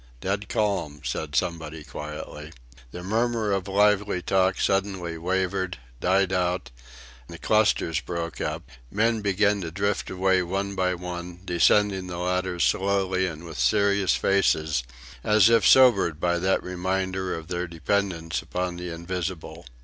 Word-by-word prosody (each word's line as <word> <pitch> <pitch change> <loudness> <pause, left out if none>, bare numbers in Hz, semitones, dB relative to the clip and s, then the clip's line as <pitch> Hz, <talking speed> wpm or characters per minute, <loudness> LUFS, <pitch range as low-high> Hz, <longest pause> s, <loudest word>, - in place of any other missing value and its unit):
"Dead 100 +5 -3
calm," 100 -9 -1
said 75 +4 -3
somebody 80 0 -2
quietly. 75 +1 -8 0.4
The 90 +7 -8
murmur 115 +1 0
of 95 -1 -1
lively 105 -1 +2
talk 95 +1 +1
suddenly 95 -3 0
wavered, 95 +1 -1 0.2
died 95 +1 +2
out; 90 -5 -1 0.6
the 85 - -9
clusters 100 -7 +2
broke 85 -2 -5
up; - - -3 0.3
men 110 +4 +1
began 100 0 +2
to 85 - -4
drift 100 +4 -1
away 95 0 +2
one 95 +3 -2
by 90 -1 0
one, 90 0 -7
descending 95 +2 +3
the 90 -1 -5
ladders 90 0 -1
slowly 95 -1 +1
and 80 -1 -7
with 80 -6 -8
serious 100 +10 +3
faces 80 -7 +1 0.4
as 105 0 +5
if 115 - +5
sobered 100 - +5
by 85 0 +1
that 95 +2 +1
reminder 95 +1 -2
of 80 -1 -8
their 90 0 -3
dependence 85 0 -1
upon 90 -1 -3
the 90 0 -5
invisible. 85 -2 -5
90 Hz, 140 wpm, -25 LUFS, 85-100 Hz, 0.6 s, as